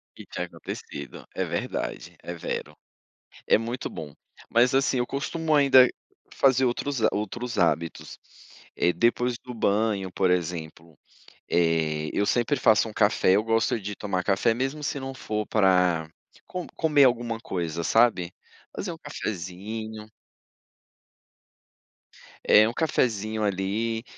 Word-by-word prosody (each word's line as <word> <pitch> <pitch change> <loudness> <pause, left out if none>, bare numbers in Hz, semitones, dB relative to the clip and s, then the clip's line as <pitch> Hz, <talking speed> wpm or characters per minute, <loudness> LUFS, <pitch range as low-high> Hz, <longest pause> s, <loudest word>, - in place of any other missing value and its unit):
Que - - -11
tinha - - -4
acontecido, 70 -1 -8
é - - 0
verdade, - - -4
é 85 - -5
vero. 75 -3 -5 0.7
É - - +5
muito 120 +3 -4
bom. 75 -3 -8 0.4
Mas 120 +2 +4
assim, 135 -1 +2
eu 120 - 0
costumo 155 +4 -2
ainda 135 -3 +7 0.5
fazer 130 -1 +4
outros 125 +1 -1
ha 110 - +5
outros 115 +4 -4
hábitos, 85 -1 -1 0.6
eh, 90 - +2
depois 120 +3 +1
do 125 - -9
banho 105 -3 0
por 95 -1 +1
exemplo, 85 -2 -3 0.5
eh, 80 -2 +1
eu 100 - 0
sempre 120 +6 +1
faço 110 -2 +4
um - - -8
café, 100 -3 +3
eu 105 - +1
gosto 115 0 +1
de 105 +1 -5
tomar 95 -3 -2
café 95 +4 +2
mesmo 135 +5 -3
se 145 - -2
não 135 0 -6
for 105 -5 -3
pra 90 -5 +3 0.4
co 180 -2 -5
comer 150 -3 +4
alguma 120 -2 +1
coisa, 85 -5 -3
sabe? 110 -6 +3 0.4
Fazer 185 - -3
um 165 - -10
cafezinho. 110 - -6 2.4
É 110 +1 +6
um 115 - -3
cafezinho 110 -8 0
ali, 105 +3 -1
110 Hz, 135 wpm, -26 LUFS, 90-125 Hz, 2.4 s, ainda